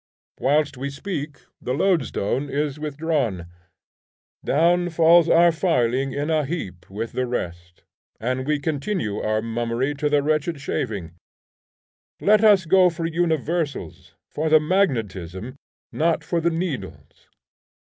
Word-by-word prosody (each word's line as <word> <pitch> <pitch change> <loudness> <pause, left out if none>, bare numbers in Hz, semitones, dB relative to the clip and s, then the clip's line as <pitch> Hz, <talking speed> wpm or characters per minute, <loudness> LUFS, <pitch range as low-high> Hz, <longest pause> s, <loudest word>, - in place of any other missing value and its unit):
Whilst 145 0 +1
we 140 +2 -3
speak 145 -1 -5 0.2
the 125 - -2
loadstone 145 - 0
is 145 +1 -2
withdrawn; 145 - -2 1.0
down 175 +4 +2
falls 165 0 +5
our 170 +1 +6
filing 135 -6 +1
in 145 +4 -2
a 155 -1 +2
heap 130 - -6
with 110 +4 -5
the 130 0 -2
rest, 90 -6 -5 0.4
and 130 +3 -2
we 150 0 +2
continue 145 - -2
our 110 0 -1
mummery 120 +4 -1
to 145 +1 -1
the 145 -1 +2
wretched 155 +1 0
shaving. 105 - -3 1.1
Let 210 +1 +4
us 205 -4 +6
go 185 +2 +5
for 170 -1 -4
universals; 160 - -2 0.2
for 155 +1 -1
the 155 0 +7
magnetism, 120 - -1 0.4
not 165 +1 0
for 170 -1 -1
the 170 - +2
needles. 165 -4 -5
145 Hz, 130 wpm, -23 LUFS, 125-165 Hz, 1.1 s, the